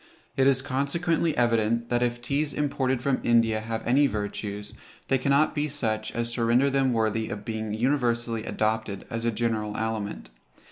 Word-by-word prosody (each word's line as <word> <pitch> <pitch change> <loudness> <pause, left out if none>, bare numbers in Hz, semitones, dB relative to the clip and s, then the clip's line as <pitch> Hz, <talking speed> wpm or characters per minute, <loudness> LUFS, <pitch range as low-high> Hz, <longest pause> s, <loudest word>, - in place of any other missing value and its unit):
It 135 0 +3
is 135 -1 +3
consequently 160 +5 0
evident, 115 -1 +2
that 120 0 +1
if 120 0 -1
teas 140 +4 -1
imported 135 -3 0
from 135 -2 +1
India 115 -2 +3
have 110 0 -4
any 140 +4 +4
virtues, 105 -2 -4 0.4
they 135 - +3
cannot 140 +4 +3
be 150 0 0
such 110 -6 -2
as 120 0 -2
to 120 - -1
render 125 +4 +3
them 135 -1 +2
worthy 110 -1 0
of 105 0 -6
being 110 -1 -3
universally 120 -2 0
adopted 110 -2 -2
as 115 0 -3
a 115 - +2
general 110 -2 -1
aliment. 110 - -3
120 Hz, 170 wpm, -26 LUFS, 110-135 Hz, 0.4 s, any